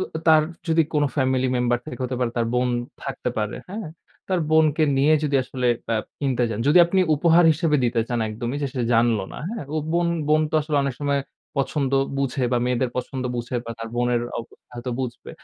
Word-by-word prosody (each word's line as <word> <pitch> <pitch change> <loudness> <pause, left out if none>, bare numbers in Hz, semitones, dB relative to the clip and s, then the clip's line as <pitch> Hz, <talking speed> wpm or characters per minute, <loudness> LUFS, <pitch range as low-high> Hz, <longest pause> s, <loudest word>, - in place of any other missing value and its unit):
উ - - 0
উ - - -2
তার 155 -1 +7 0.3
যদি 165 0 +4
কোনো 145 -1 +3
family 130 -1 +2
member 120 0 +2
থেকে, 125 - -7
হতে 125 0 -3
পারে 120 -2 +1
তার 115 -1 +1
বোন 125 0 +2 0.3
থাকতে 135 -2 -3
পারে, 105 -1 -2
হ্যাঁ? 210 -1 -5 0.4
তার 185 -2 +1
বোনকে 155 -1 +4
নিয়ে 145 +3 +4
যদি 140 -2 +2
আসলে 125 -1 -3 0.2
প্যাপ 110 -1 -1 0.2
কিনতে 130 -4 0
যান। 110 - -3
যদি 170 +4 +6
আপনি 190 +2 +2
উপহার 170 +3 +4
হিসেবে 155 -1 +1
দিতে 120 -1 +1
চান 120 -1 -1
একদমই 120 +5 -4
যে 140 - 0
সে 125 - -1
জানলো 115 -3 +3
না, - - -7
হ্যাঁ? 225 -6 -5
ও - - 0 0.2
বোন 170 0 +2 0.2
বোন 155 0 +4
তো - - -6
আসলে 150 0 -2
অনেক 140 -2 -2
সময় 140 -1 +1 0.4
পছন্দ 135 0 0 0.3
বুঝে 135 -1 -1
বা 120 - +3
মেয়েদের 125 0 0
পছন্দ 130 +1 -3
বুঝে 120 +1 -3
বা 115 - -6
তার 115 - -5
বোনের 120 -1 +1 0.2
অবস্থা 115 - -11
হয়তো 120 +1 -5
বুঝবে। 125 -1 -5
130 Hz, 210 wpm, -23 LUFS, 120-150 Hz, 0.4 s, তার